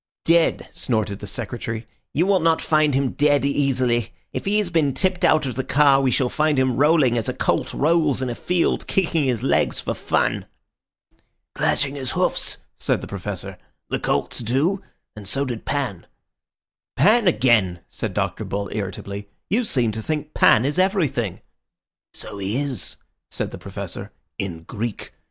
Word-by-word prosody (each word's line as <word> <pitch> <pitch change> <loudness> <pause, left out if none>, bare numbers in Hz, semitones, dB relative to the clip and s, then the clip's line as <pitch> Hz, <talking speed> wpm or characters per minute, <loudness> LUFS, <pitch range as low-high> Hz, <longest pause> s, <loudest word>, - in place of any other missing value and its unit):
"Dead!" 165 0 +3
snorted 110 -4 -1
the 105 - -7
Secretary. 115 +1 -4 0.3
"You 165 +5 +2
will 195 -1 +3
not 165 -1 +3
find 155 -3 +2
him 135 -1 +1
dead 145 -1 +2
easily. 130 -5 +1 0.2
If - - -4
he 205 +2 +2
has 205 -4 0
been 150 -5 +2
tipped 185 -1 0
out 155 -2 +4
of 130 - -2
the 130 +3 -2
car, 140 -1 +4
we 135 - +2
shall 125 +1 +2
find 150 +2 +1
him 130 -2 +2
rolling 145 -5 +4
as 110 - -2
a - - -3
colt - - 0
rolls 155 -2 +2
in 130 - -1
a 120 - -2
field, 175 +7 0
kicking 165 -5 +1
his 125 -4 0
legs - - +2
for - - -2
fun." - - 0 1.1
"Clashing 140 -1 +1
his 130 -3 -3
hoofs," - - 0 0.2
said - - 0
the - - -7
Professor. - - -5 0.3
"The - - 0
colts - - -1
do, 140 - +1 0.3
and 105 -2 -8
so 140 +7 0
did 120 -4 -5
Pan." 125 -12 -2 0.9
"Pan 220 +1 +4
again!" 105 - +3
said - - -5
Dr. - - -1
Bull 100 0 -3
irritably. 100 0 -5 0.2
"You 235 +5 +3
seem 125 - +1
to 110 +1 -4
think 150 +4 -3
Pan 110 - +5
is 145 +6 0
everything." 155 - +1 0.7
"So 105 -2 -6
he 100 +4 -2
is," 140 -8 -2 0.3
said - - -3
the - - -8
Professor, - - -6 0.3
"in 85 -4 -4
Greek. 110 +4 -5
135 Hz, 170 wpm, -22 LUFS, 115-155 Hz, 1.1 s, Pan